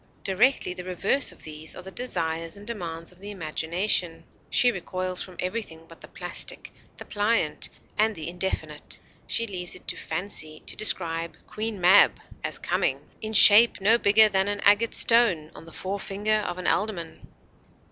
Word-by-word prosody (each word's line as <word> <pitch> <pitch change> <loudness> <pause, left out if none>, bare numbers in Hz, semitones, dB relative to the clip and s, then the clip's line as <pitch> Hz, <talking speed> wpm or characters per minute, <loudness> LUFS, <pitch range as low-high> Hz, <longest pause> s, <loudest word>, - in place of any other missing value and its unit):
Directly 195 +1 +1
the 180 - -8
reverse 195 +9 0
of - - -16
these 155 0 -7
are 185 - -10
the 190 - -10
desires 165 -8 -3
and 200 - -12
demands 170 -7 -6
of 180 - -21
the 200 +2 -8
imagination. 170 -1 -2 0.3
She 245 - +4
recoils 185 -2 -2
from 185 - -8
everything 180 -4 -5
but 165 - -16
the - - -12
plastic, - - -5 0.2
the - - -10
pliant, 205 -6 -1 0.3
and 220 0 +2
the 160 -2 -6
indefinite. 170 -4 -5 0.3
She 230 - 0
leaves 180 -5 -5
it 185 - -14
to - - -1
fancy 155 -5 -4
to - - -7
describe 170 -5 +2
Queen 215 -1 -5
Mab 180 +1 +5 0.2
as - - -2
coming: - - -1 0.2
'In 220 0 -4
shape 215 +2 +8
no 220 +4 +4
bigger 215 +1 +6
than 195 -1 0
an 205 0 -2
agate 205 +3 +3
stone 200 -10 +3
On - - -13
the 165 - -13
forefinger 200 +3 -3
of 175 - -5
an 185 - -7
alderman.' 195 -6 -2
185 Hz, 165 wpm, -25 LUFS, 165-210 Hz, 0.3 s, shape